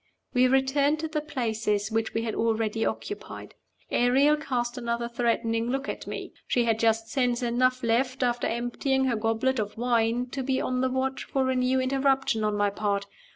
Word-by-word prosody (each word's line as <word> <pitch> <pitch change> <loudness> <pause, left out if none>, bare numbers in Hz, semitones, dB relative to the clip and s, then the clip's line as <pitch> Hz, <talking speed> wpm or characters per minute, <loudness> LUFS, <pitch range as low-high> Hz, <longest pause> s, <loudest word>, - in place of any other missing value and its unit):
We 255 0 +5
returned 270 +3 +2
to 320 - -2
the 310 -1 -2
places 220 -7 -1
which 225 0 -1
we 225 - 0
had 225 -2 -2
already 225 -1 0
occupied. 410 - -5 0.4
Ariel 270 +5 +4
cast 250 -5 -2
another 235 -1 -2
threatening 230 -1 0
look 270 +2 -2
at - - -5
me. - - -6
She 245 - +2
had 225 -1 +1
just 225 0 +2
sense 245 -2 0
enough 255 +1 +1
left, 255 +3 +1
after 245 -1 0
emptying 245 +3 0
her 250 -3 +1
goblet 225 +4 0
of 210 0 -3
wine, 235 0 +1
to 275 - -3
be 260 0 0
on 255 0 -1
the 260 - +2
watch 260 +1 -2
for 265 -1 0
a - - 0
new 255 +1 +2
interruption 270 -3 +1
on 210 -1 +1
my 205 0 +2
part. 200 -1 -1
245 Hz, 185 wpm, -27 LUFS, 225-265 Hz, 0.4 s, We